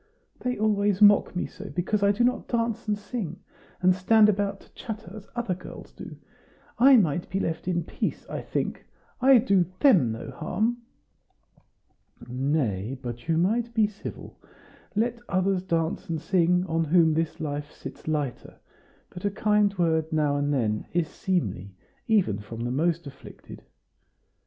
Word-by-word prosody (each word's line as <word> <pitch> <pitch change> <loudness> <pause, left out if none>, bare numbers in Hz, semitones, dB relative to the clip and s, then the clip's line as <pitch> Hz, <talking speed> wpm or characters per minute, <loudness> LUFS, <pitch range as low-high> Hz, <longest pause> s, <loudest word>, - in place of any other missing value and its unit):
"They 250 0 -2
always 205 -2 +1
mock 205 -2 +5
me 180 - -1
so, 200 +1 -9
because 190 +4 -1
I 200 0 +4
do 210 +4 +1
not 250 +1 +1
dance 230 -2 -1
and 210 -1 +1
sing, 205 -5 -5 0.4
and 185 0 +6
stand 210 +4 +5
about 200 -1 -1
to - - -21
chatter, 215 -5 -7
as 210 -2 -10
other 240 -6 -1
girls 180 +1 -10
do. - - -10 0.6
I 265 +2 +8
might 175 -5 +1
be 190 - -1
left 165 -2 -3
in 175 -2 0
peace, - - -4
I - - -5
think; - - -3 0.3
I 265 0 +7
do 200 -6 +3 0.2
THEM 180 - +5
no 110 - -6
harm." 230 +3 -1 1.5
"Nay, 125 -4 -1
but 120 0 -7
you 165 -1 +2
might 230 +7 0
be 220 -2 +4
civil. 210 0 -8 0.6
Let 235 +2 0
others 185 0 +1
dance 165 -3 -2
and 165 -1 -1
sing, 180 +1 +2
on 165 -2 0
whom 160 0 +4
this 160 0 -1
life 145 -1 -4
sits - - -10
lighter; 150 -5 -3 0.6
but 180 - -10
a 205 - +2
kind 210 0 +2
word 160 -2 +1
now 150 -2 +1
and 145 0 0
then 110 -6 0
is 170 -2 0
seemly 100 - -2 0.3
even 195 - +2
from 110 +3 -8
the 120 +1 -2
most 165 +4 0
afflicted." 140 -1 -12
180 Hz, 160 wpm, -26 LUFS, 150-210 Hz, 1.5 s, I